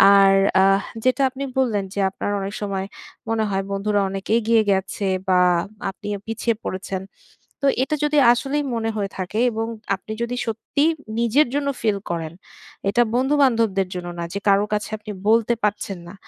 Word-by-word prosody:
আর 195 -1 +6 0.3
আহ 195 +1 +4 0.2
যেটা 255 +2 +3
আপনি 265 +2 -6 0.2
বললেন 220 -6 +1
যে, 205 - -3
আপনার 205 - -3
অনেক 195 +1 -4
সময় 195 -2 -2 0.4
মনে 225 -1 +1
হয় 195 0 -1
বন্ধুরা 200 +1 +1
অনেক 195 0 -5
এগিয়ে 230 0 +3
গেছে 195 +1 -1 0.2
বা, 185 -1 +5 0.5
আপনি 205 +1 -11
আ - - -13
পিছিয়ে 225 +1 -1
পড়েছেন। 190 0 -4 0.6
তো - - 0 0.2
এটা 290 +3 -1
যদি 300 0 +2 0.2
আসলেই 280 +4 -1
মনে 225 -1 -1
হয়ে 200 -2 -2
থাকে 190 +3 -3
এবং 225 0 -2 0.3
আপনি 195 - -11
যদি 240 +1 -3
সত্যি 230 +6 -1 0.4
নিজের 235 +6 +3
জন্য 290 -1 0
ফিল 215 -3 +1
করেন। 165 -2 -3 0.6
এটা 220 +4 +3
বন্ধু-বান্ধবদের 245 -8 +2
জন্য 175 -1 -5
না - - -2
যে 200 - -2
কারো 200 +1 +4
কাছে 210 0 -1
আপনি 215 0 -8 0.2
বলতে 230 +1 +4
পারছেন 205 -2 -1
না। 175 - -10
210 Hz, 170 wpm, -22 LUFS, 195-235 Hz, 0.6 s, আর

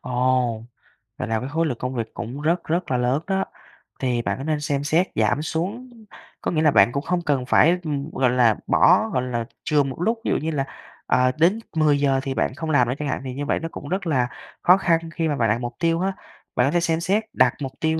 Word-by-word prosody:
Ồ, 125 -2 0 0.6
vậy - - -4
là 110 -1 0
cái 130 +4 -5
khối 165 +2 0
lượng 125 -7 -2
công 125 +1 -4
việc 115 -1 -4
cũng 120 +5 -6
rất, 170 +3 +1
rất 170 -1 -1
là 125 - +2
lớn 125 +5 +1
đó, 195 -1 +1 0.6
thì 125 -3 0
bạn - - -2
có 135 - -6
nên 155 -1 -1
xem 145 -2 -1
xét 165 +6 +2
giảm 150 - +1
xuống? 190 +11 -3 0.5
Có - - -1
nghĩa 155 -2 +1
là 150 -2 +4
bạn 120 - +5
cũng 140 +2 -2
không 175 +1 -1
cần 135 -4 +1
phải, 170 +7 +4
ừm, 145 -1 -3
gọi 130 -2 +2
là, 120 -3 +4
bỏ 220 +5 +4
gọi 125 - +1
là, 120 -2 -2 0.2
chừa 150 -2 +2
một 135 +4 -6
lúc, 225 +4 +1
ví - - +1
dụ - - +2
như 160 +2 -2
là, 140 -3 -1 0.4
ờ, 125 0 +3
đến 185 +7 +4 0.2
10:00 145 -3 +3
thì 135 - -2
bạn 130 - -1
không 160 0 -5
làm 125 -5 +3
nữa 125 - +1
chẳng 150 - -2
hạn, 130 - -2
vì 130 -1 -5
như 145 +2 -4
vậy - - 0
nó 165 0 -5
cũng 145 - -8
rất 185 0 -2
là 125 -5 +1 0.3
khó 180 +2 +6
khăn 170 -4 +2 0.2
khi 165 -1 0
mà 150 - 0
bạn 115 -4 +1
đặt 115 +3 +1
mục 120 0 -4
tiêu 165 0 +1
á. 195 +1 0 0.4
Bạn 125 - +3
có - - +1
thể 175 - +2
xem 165 -1 +1
xét, 200 +5 +1
đặt - - +4
mục 135 -1 -3
tiêu 160 0 +1
145 Hz, 255 wpm, -23 LUFS, 125-165 Hz, 0.6 s, khó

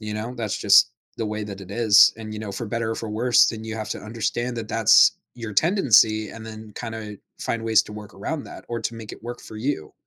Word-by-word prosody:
You 105 -1 -5
know, 110 +4 -5
that's 110 -5 -3
just - - +6 0.3
the 115 - -2
way 105 0 -4
that 100 -1 -8
it 95 -1 -11
is. 110 -1 +6
And, 110 -1 -8
you 110 - -6
know, 105 -2 -6
for 115 - -5
better 115 +1 -2
or - - -1
for 110 - -6
worse, 120 +3 +4
then 110 -1 -5
you 110 - -5
have 110 -1 -5
to - - -3
understand 120 +2 -3
that 115 -1 -5
that's 115 -1 +6 0.2
your 115 -3 -7
tendency 110 - +4
and 115 - -10
then 110 -1 -10
kinda 110 -3 -6 0.2
find 115 - -2
ways 110 -1 +4
to 105 - -11
work 105 0 -10
around 145 +10 -4
that - - -11
or 120 0 -3
to 115 - -3
make 115 -2 -9
it - - -12
work 120 +1 -7
for 110 - -11
you 110 - -3
110 Hz, 250 wpm, -23 LUFS, 105-115 Hz, 0.3 s, just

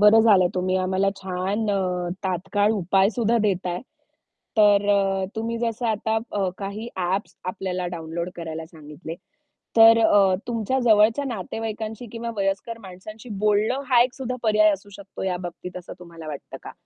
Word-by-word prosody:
बरं 210 +2 +7
झालंय 190 -5 +6
तुम्ही 185 0 0
आम्हाला 185 +1 +1
छान 190 +3 -2
अ, 180 -3 -1 0.2
तात्काळ 200 +3 +1
उपायसुद्धा 205 +4 +2
देताय. 180 -2 -1 0.8
तर 205 -1 +5
अ, 195 -1 +2
तुम्ही 230 +1 -2
जसं 235 0 -2
आता 220 +1 0 0.4
काही 205 +3 -5
अ, - - -6
ॲप्स 200 - -3 0.2
आपल्याला 185 -2 -3
डाउनलोड 165 +2 -4
करायला 160 -1 -6
सांगितले. 160 0 -9 0.6
तर 225 0 +8
अ, 195 -2 +5
तुमच्या 235 +2 -1
जवळच्या 220 +4 +4
नातेवाईकांशी 225 0 -5
किंवा 230 0 -4
वयस्कर 195 +3 -2
माणसांशी 205 +5 -11 0.2
बोलणं 215 +6 +2
हा 240 - +6
एक 255 +1 -2
सुद्धा 255 -2 -4
पर्याय 215 -1 +4
असू 200 +1 -6
शकतो 200 -1 -9
या 185 -1 0
बाबतीत, 180 +1 -7
असं 180 - -8
तुम्हाला 170 -2 -11
वाटतं 145 -2 -7
का? - - -9
200 Hz, 150 wpm, -24 LUFS, 180-220 Hz, 0.8 s, तर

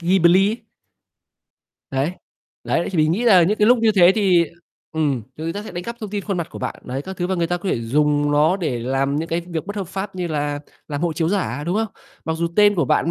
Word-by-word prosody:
Ghibli 185 +2 +4
ấy. 225 - -3 1.3
Đấy, 135 +6 0 0.5
đấy. 170 - 0
Thì 180 - -2
mình 155 +1 +3
nghĩ 225 +7 -1
là 190 -7 +7
những 205 +6 +1
cái 210 - +4
lúc 245 +1 +6
như 225 -1 +3
thế 185 -2 +6
thì, 185 -5 +4 0.5
ừm, 145 -6 0
thì 155 - -6
người 165 - -2
ta 205 +4 -5
sẽ - - -8
đánh 175 0 -5
cắp 235 0 -5
thông 215 -3 -6
tin 205 -2 -3
khuôn 200 -3 -2
mặt 170 -2 -3
của - - -8
bạn, - - -3
đấy, 130 +2 -4
các 190 +4 -7
thứ. 175 - -1
Và 190 - -1
người 170 -1 0
ta 175 +1 -1
có 185 +3 -5
thể 120 - 0
dùng 145 +4 +1
nó 155 +6 +3
để 150 -10 -2
làm 135 +3 0
những 160 +2 -2
cái 170 +1 0
việc 170 -1 -4
bất 205 +1 -6
hợp 195 - -3
pháp 190 +1 -5
như 180 -1 -3
là 145 -1 -2 0.3
làm 145 -2 -3
hộ 170 -2 +1
chiếu 160 0 0
giả, 175 -9 -1
đúng 180 +4 0
không? 225 - +1 0.4
Mặc 160 -1 -1
dù 170 +1 0
tên 205 0 +6
của 165 -6 +1
bạn, 165 - +1
175 Hz, 265 wpm, -21 LUFS, 150-195 Hz, 1.3 s, là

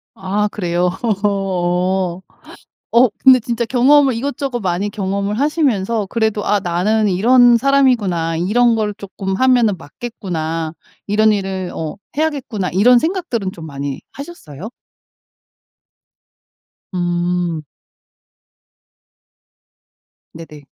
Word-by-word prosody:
아 200 +2 -1
그래요? 175 -2 0 0.3
어. 185 -2 0 0.7
어 240 +1 +5
근데 260 -1 +6
진짜 235 0 -2
경험을 265 +3 +4
이것저것 270 +1 -3
많이 185 +2 -1
경험을 200 +1 -2
하시면서 235 - 0
그래도 220 0 -1
'아 205 0 +2
나는 200 +5 +1
이런 240 +5 +5
사람이구나. 230 -12 +1
이런 230 +7 +2
걸 210 -2 -1
쪼끔 195 -1 -5
하면은 245 -4 +3
맞겠구나. 165 -3 -5 0.3
이런 215 +1 +3
일을 190 -2 -3
어 160 +1 -4 0.2
해야겠구나.' 275 -11 -2
이런 240 +7 +5
생각들은 320 - -2
좀 165 -3 -10
많이 140 -2 -5
하셨어요? 220 - -9 2.2
음. 175 -2 -1 2.7
네네. 155 -3 -12
205 Hz, 225 characters per minute, -18 LUFS, 180-240 Hz, 2.7 s, 근데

